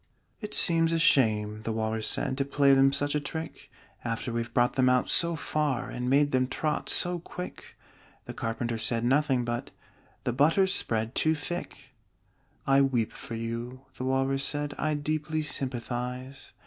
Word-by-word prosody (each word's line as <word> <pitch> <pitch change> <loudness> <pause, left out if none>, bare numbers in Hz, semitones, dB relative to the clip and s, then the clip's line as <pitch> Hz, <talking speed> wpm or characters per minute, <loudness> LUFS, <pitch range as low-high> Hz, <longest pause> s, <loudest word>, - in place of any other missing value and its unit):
"It 210 - -5
seems 165 -1 +4
a - - +2
shame," 110 -8 +3
the 115 - -3
Walrus 110 0 -1
said, 130 - 0
"To - - +3
play 140 0 +3
them 135 0 +5
such 145 +1 0
a 150 - +1
trick, 160 +2 -6 0.3
After 115 0 -3
we've 115 0 -3
brought 120 +1 +2
them 130 -1 +3
out 125 0 +2
so 170 -1 +3
far, 150 -5 -2
And 125 0 -3
made 145 +2 +3
them 130 0 +2
trot 150 +3 -2
so 175 -1 0
quick!" 180 +2 -9 0.5
The - - -7
Carpenter 115 0 -3
said 115 +1 +2
nothing 135 -1 +2
but 120 0 -3 0.5
"The 125 - -1
butter's 165 +9 +3
spread 110 - -1
too 160 +3 +3
thick!" 145 -4 -6 0.7
"I 135 0 +4
weep 125 -5 +1
for 115 - -7
you," 115 +3 -5 0.2
the 130 - -3
Walrus 135 +1 0
said; 145 0 -2
"I 155 -1 0
deeply 155 +1 -2
sympathize." 130 -1 -4
135 Hz, 165 wpm, -28 LUFS, 120-150 Hz, 0.7 s, them